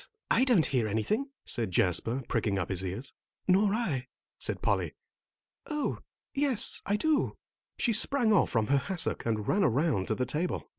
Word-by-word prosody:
I 255 - +4
don't 230 -11 +4
hear 125 -5 0
anything," 210 - -1 0.2
said 115 -4 -1
Jasper, 95 +8 +1
pricking 100 -3 0
up 90 - -2
his 95 -1 0
ears. 95 +9 -5 0.3
"Nor 195 +2 +4
I," 145 - -2 0.3
said - - -2
Polly. - - 0 0.7
"Oh, 300 -2 -2 0.3
yes, 265 -4 +2
I 205 - +2
do." 310 +7 +1 0.4
She 235 - +2
sprang 230 +1 +2
off 200 - +4
from 115 -3 +1
her 140 +4 +3
hassock 175 -3 -1
and 110 -2 -1
ran 200 +1 +2
around 135 - +1
to 110 - 0
the 125 - -1
table. 155 +8 -2
150 Hz, 165 wpm, -29 LUFS, -, 0.7 s, I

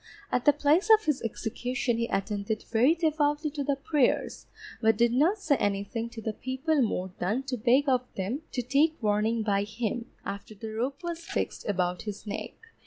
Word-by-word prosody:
At 250 - 0
the 295 - +8
place 295 +7 +2
of 435 0 +6
his 300 -4 +1
execution 240 +2 -2
he 235 - 0
attended 205 +1 -2
very 250 +8 +4
devoutly 305 -2 +1
to 285 -1 -3
the 280 0 +1
prayers, 275 -1 0 0.3
but 220 -1 +4
did 235 +1 +3
not 320 - +3
say 310 -8 +1
anything 205 +3 -1
to 235 -1 -8
the 220 - -2
people 265 +6 0
more 190 -5 -1
than 215 +9 0
to 270 -1 -3
beg 250 +5 +3
of 255 -2 +3
them 205 +10 -2
to 250 - -1
take 290 +6 +2
warning 215 +2 +1
by 200 -2 +2
him, 225 +3 -3 0.2
after 200 +2 -6
the 220 +1 -7
rope 270 +8 -3
was 340 -1 -3
fixed 330 - -3
about 180 -2 0
his 210 -1 -6
neck. 205 - -5
245 Hz, 185 wpm, -28 LUFS, 215-285 Hz, 0.3 s, the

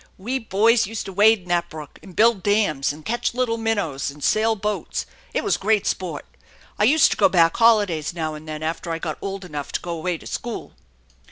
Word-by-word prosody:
We 245 +8 -2
boys 225 +1 +3
used 225 0 -5
to 195 - -7
wade 210 +2 +5
in - - -18
that 175 -1 +1
brook, 155 -2 -10
and 185 -3 -14
build 225 -3 +4
dams 200 -9 +1
v 145 - -3
and 155 - -15
catch 235 +1 -1
little 245 -2 0
minnows, 205 -13 -1
and 145 +1 -11
sail 220 +1 +2
boats. 210 0 -3 0.3
It - - -1
was 410 - +1
great 210 0 +1
sport 170 -6 -3 0.5
I 210 - +4
used 290 +6 +5
to - - -1
go - - +5
back 165 -3 +4
holidays 205 -9 +3
now 160 -2 -3
and 155 +1 -10
then 155 0 -5
after 165 +2 -3
I 165 - -1
got 160 -2 -5
old 195 -1 -5
enough 150 -4 -6
Co - - 0
go 175 - -6
away 180 0 -2
to - - -16
school. 240 -1 -5
195 Hz, 225 wpm, -22 LUFS, 160-225 Hz, 0.5 s, wade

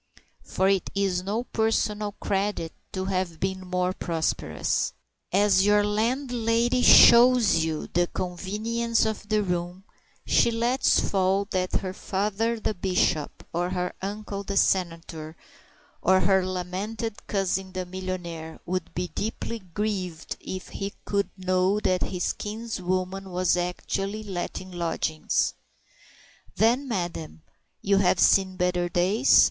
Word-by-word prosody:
For 190 - 0
it 195 -1 +1
is 195 -2 +1
no 205 +5 -2
personal 215 -3 0
credit 195 -5 -2 0.2
to 190 0 -3
have 185 -4 -2
been 190 0 -1
more 180 0 -1
prosperous. 165 -4 -1 0.4
As 195 0 +4
your 205 0 +4
landlady 235 +2 +1
shows 235 -9 +7
you 160 -1 -2
the 175 +1 +1
convenience 215 +7 -1
of 215 -1 -4
the 215 -1 +2
room, 180 0 -3 0.4
she - - +4
lets 235 +3 +2
fall 195 +1 +1
that 185 -1 -1
her 185 -1 -4
father 210 +4 -1
the 215 - -1
Bishop, 180 -5 0
or 175 +1 0
her 180 -1 -2
uncle 200 0 -4
the 200 0 -3
Senator, 165 -4 0 0.6
or 185 +1 +4
her 190 -1 +3
lamented 190 +5 -4
cousin 190 -1 -1
the 185 0 -4
millionaire 180 -3 -6
would 185 -1 -3
be 180 0 -2
deeply 225 +2 -4
grieved 185 -3 -4
if 185 0 -7
he 200 0 -5
could 200 -1 0
know 185 +2 +1
that 185 -3 +1
his 180 -2 -1
kinswoman 195 -3 -3
was 180 0 +1
actually 195 +4 -3
letting 185 -1 -5
lodgings. 165 -2 -1 1.0
"Then, 245 +6 +2
madam, 175 -7 -4 0.4
you 200 0 +3
have 185 -2 +3
seen 190 -1 +4
better 180 -1 0
days?" 195 +9 +4
190 Hz, 125 wpm, -26 LUFS, 180-210 Hz, 1.0 s, shows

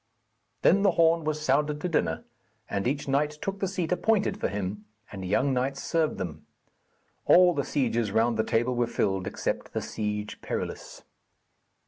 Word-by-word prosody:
Then 195 +4 +5
the 200 - +5
horn 165 -1 +4
was 155 0 -1
sounded 150 +2 +2
to - - -1
dinner, 85 - 0 0.4
and 100 +3 -2
each 140 +3 -2
knight 150 +2 +1
took 195 +3 -4
the 195 - 0
seat 180 -3 -3
appointed 210 +3 +1
for - - 0
him, 100 +1 -4 0.3
and 95 -2 -7
young 130 +9 +1
knights 135 +2 -1
served 160 -2 0
them. 80 -4 -6 0.8
All 180 0 +7
the 140 - -1
sieges 120 -7 0
round 115 +2 +2
the 110 - +1
table 120 +3 +1
were 120 -1 +1
filled 95 -5 -1
except - - -3
the - - -1
Siege 105 -1 -4
Perilous. - - -5
135 Hz, 165 wpm, -27 LUFS, 105-160 Hz, 0.8 s, All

